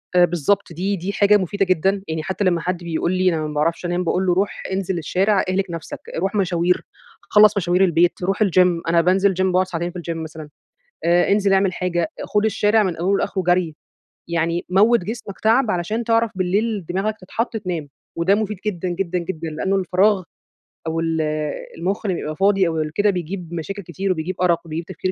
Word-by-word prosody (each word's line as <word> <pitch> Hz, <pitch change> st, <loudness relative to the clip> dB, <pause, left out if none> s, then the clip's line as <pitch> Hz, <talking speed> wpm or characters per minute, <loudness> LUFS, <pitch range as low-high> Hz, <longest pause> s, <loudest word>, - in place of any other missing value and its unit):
آآ، 180 Hz, 0 st, +7 dB
بالضبط 175 Hz, +3 st, 0 dB
دي 190 Hz, +5 st, -1 dB
دي 190 Hz, +2 st, -4 dB
حاجة 205 Hz, +1 st, +5 dB
مفيدة 195 Hz, +1 st, -1 dB
جدًا، 190 Hz, +2 st, +1 dB
يعني 160 Hz, -1 st, -3 dB
حتى 190 Hz, +4 st, -2 dB
لمّا 175 Hz, -3 st, +2 dB
حد 180 Hz, +1 st, -1 dB
بيقول 170 Hz, 0 st, -1 dB
لي 185 Hz, 0 st, +2 dB
أنا 160 Hz, -, -2 dB
ما 150 Hz, -, -6 dB
باعرفش 165 Hz, +4 st, 0 dB
أنام، 175 Hz, +1 st, -1 dB
باقول 180 Hz, +2 st, 0 dB
له: 180 Hz, -, +3 dB
"روح 195 Hz, +3 st, -1 dB
انزل 190 Hz, -1 st, -1 dB
الشارع 190 Hz, +5 st, +1 dB
اهلِك 190 Hz, +1 st, +1 dB
نفسَك، 165 Hz, -1 st, -6 dB, 0.2 s
روح 195 Hz, +5 st, -1 dB
مشاوير، 180 Hz, -2 st, +1 dB, 0.4 s
خلّص 210 Hz, 0 st, +5 dB
مشاوير 180 Hz, 0 st, +2 dB
البيت، 175 Hz, 0 st, +2 dB
روح 195 Hz, +4 st, +1 dB
الgym، 180 Hz, -3 st, +3 dB
أنا 170 Hz, 0 st, +4 dB
بانزل 190 Hz, +3 st, +3 dB
gym 185 Hz, -, -2 dB
باقعد 185 Hz, 0 st, +2 dB
ساعتين 175 Hz, -1 st, -3 dB
في 180 Hz, -, -7 dB
الgym 170 Hz, -1 st, -4 dB
مثلًا. 160 Hz, -1 st, -8 dB, 0.6 s
آآ، 175 Hz, +1 st, +3 dB
انزل 200 Hz, -1 st, +3 dB
اعمل 195 Hz, -1 st, +3 dB
حاجة، 175 Hz, -3 st, -1 dB, 0.2 s
خد 210 Hz, 0 st, 0 dB
الشارع 215 Hz, 0 st, +3 dB
من 185 Hz, -5 st, -1 dB
أوله 185 Hz, +4 st, +1 dB
لآخره 190 Hz, -, -1 dB
جري، 175 Hz, -3 st, +1 dB, 0.5 s
يعني 170 Hz, 0 st, -1 dB
موّت 215 Hz, +6 st, +4 dB
جسمَك 205 Hz, +1 st, -7 dB
تعب 225 Hz, +2 st, +3 dB
علشان 210 Hz, +6 st, -1 dB
تعرف 230 Hz, 0 st, +2 dB
بالليل 200 Hz, +2 st, 0 dB
دماغَك 195 Hz, +4 st, -1 dB
تتحط 225 Hz, +5 st, -3 dB
تنام." 180 Hz, -8 st, -4 dB, 0.3 s
وده 170 Hz, +4 st, +3 dB
مفيد 210 Hz, -1 st, -2 dB
جدًا، 185 Hz, -3 st, -2 dB
جدًا، 180 Hz, 0 st, -2 dB
جدًا 165 Hz, -2 st, -5 dB
لأنه 190 Hz, +6 st, -1 dB
الفراغ 190 Hz, +1 st, +2 dB, 0.7 s
أو 160 Hz, 0 st, -1 dB
ال 165 Hz, -1 st, 0 dB, 0.6 s
المخ 190 Hz, +6 st, -2 dB
لمّا 190 Hz, -3 st, 0 dB
بيبقى 155 Hz, -2 st, -4 dB
فاضي 195 Hz, +1 st, +3 dB
أو 165 Hz, -1 st, -2 dB
ال 155 Hz, 0 st, -3 dB
كده 205 Hz, +5 st, +2 dB
بيجيب 180 Hz, -1 st, -4 dB
مشاكل 195 Hz, +5 st, -5 dB
كتير 185 Hz, +3 st, -3 dB
وبيجيب 180 Hz, +1 st, -2 dB
أرق 175 Hz, -2 st, +3 dB
وبيجيب 165 Hz, +1 st, -5 dB
تفكير 185 Hz, +1 st, -3 dB
185 Hz, 195 wpm, -21 LUFS, 170-200 Hz, 0.7 s, آآ